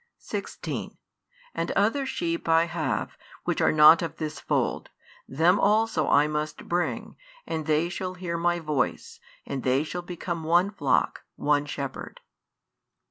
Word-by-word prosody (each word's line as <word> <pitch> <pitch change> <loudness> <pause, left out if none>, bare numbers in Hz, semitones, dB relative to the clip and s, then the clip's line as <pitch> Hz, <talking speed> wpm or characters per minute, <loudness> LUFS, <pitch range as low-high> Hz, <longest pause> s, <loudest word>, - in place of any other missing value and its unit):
16 - - -5 0.6
And - - -2
other 230 +7 +1
sheep 170 -7 -2
I 165 +1 +5
have, 155 -10 -3 0.2
which - - -1
are - - +4
not 155 +2 +8
of 165 -2 -4
this 155 -1 -4
fold: - - -1 0.4
them 165 +8 +3
also 210 -6 +2
I 145 +1 +5
must 150 0 -4
bring; 175 +1 -2 0.3
and 160 -1 -4
they 155 +2 +2
shall 185 +1 -4
hear 175 -2 -4
My 175 +1 +1
voice; 150 -6 -2 0.3
and 140 -2 -4
they 130 +3 +2
shall 175 +3 -5
become 175 -1 -5
one 175 +5 +3
flock, 145 -10 0
one 145 0 +1
shepherd. 140 -2 -6
165 Hz, 140 wpm, -26 LUFS, 150-175 Hz, 0.6 s, not